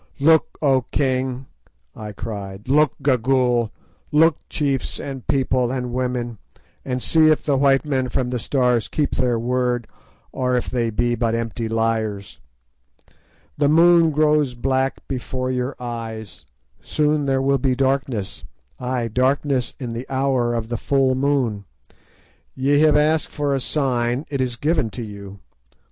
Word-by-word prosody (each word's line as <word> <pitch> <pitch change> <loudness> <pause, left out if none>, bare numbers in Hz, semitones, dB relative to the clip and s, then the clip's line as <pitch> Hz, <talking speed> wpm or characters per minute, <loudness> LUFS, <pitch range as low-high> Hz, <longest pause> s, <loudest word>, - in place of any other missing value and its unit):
"Look, 160 +3 +3
O 135 -3 +4
king!" 130 -1 -1 0.5
I 105 -1 -7
cried; 100 -1 -7
"look, 150 +2 +3
Gagool! 125 -3 +2 0.4
Look, 155 +1 +4
chiefs 140 -4 -1
and 135 -3 -7
people 130 -2 +1
and 125 -2 -3
women, 125 -3 -2 0.4
and 125 -1 -3
see 160 -1 +4
if 155 - +2
the 145 - +2
white 135 +1 +3
men 130 -3 -1
from 125 0 -1
the 125 - -1
Stars 125 -2 +1
keep 150 -2 -1
their 125 -2 +1
word, 125 0 -1 0.4
or 125 -1 0
if 125 - -3
they 120 -2 0
be 120 +2 0
but 115 -1 0
empty 115 0 -3
liars! 110 -3 -2 1.2
"The 145 -1 +3
moon 170 +1 +6
grows 150 -3 +2
black 130 +2 -1
before 130 0 -3
your 125 +1 -2
eyes; 115 -3 -7 0.3
soon 150 -1 0
there 135 -1 +2
will 135 +1 +2
be 130 0 +1
darkness—ay, 130 -1 -3
darkness 130 +1 0
in 120 -4 -5
the 120 +3 -6
hour 130 -3 +1
of 115 -1 -3
the 120 - -2
full 135 +1 +2
moon. 130 -7 0 0.9
Ye 140 +2 +2
have 155 -1 +5
asked 155 +1 +2
for 145 -1 -1
a 135 - +1
sign; 125 -1 0
it 140 -2 -1
is 125 -2 -1
given 145 -2 0
to 120 - -3
you. 100 -2 -10
130 Hz, 145 wpm, -21 LUFS, 120-140 Hz, 1.2 s, moon